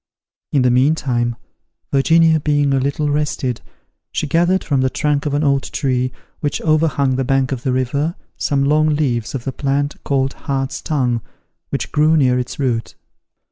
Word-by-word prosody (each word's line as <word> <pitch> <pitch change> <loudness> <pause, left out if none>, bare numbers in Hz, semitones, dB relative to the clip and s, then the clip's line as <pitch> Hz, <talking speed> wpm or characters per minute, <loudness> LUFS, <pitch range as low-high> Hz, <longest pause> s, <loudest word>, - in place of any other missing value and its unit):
In 140 -3 +3
the 125 - +4
meantime, 125 -3 +1 0.6
Virginia 160 +4 +4
being 145 -1 +1
a 135 - +2
little 140 +2 -1
rested, 145 -4 -1 0.5
she - - -2
gathered 175 +5 +2
from 140 -4 +1
the 130 - +2
trunk 150 +1 0
of 145 - -1
an 145 - +1
old 140 -2 +2
tree, 130 -3 0 0.3
which 145 -1 -2
overhung 150 -4 +2
the 135 - 0
bank 135 0 +1
of 130 -3 -3
the 130 -1 -1
river, 140 +6 -1 0.2
some 140 -1 0
long 155 +2 +3
leaves 130 -3 -1
of 125 - -4
the 135 - -3
plant 140 +1 -2
called 135 -1 0
hart's 135 -2 -3
tongue, 125 -6 0 0.5
which - - -3
grew 155 +2 +3
near 125 -3 +3
its 125 - -5
root. 120 -5 -1
140 Hz, 170 wpm, -19 LUFS, 130-150 Hz, 0.6 s, the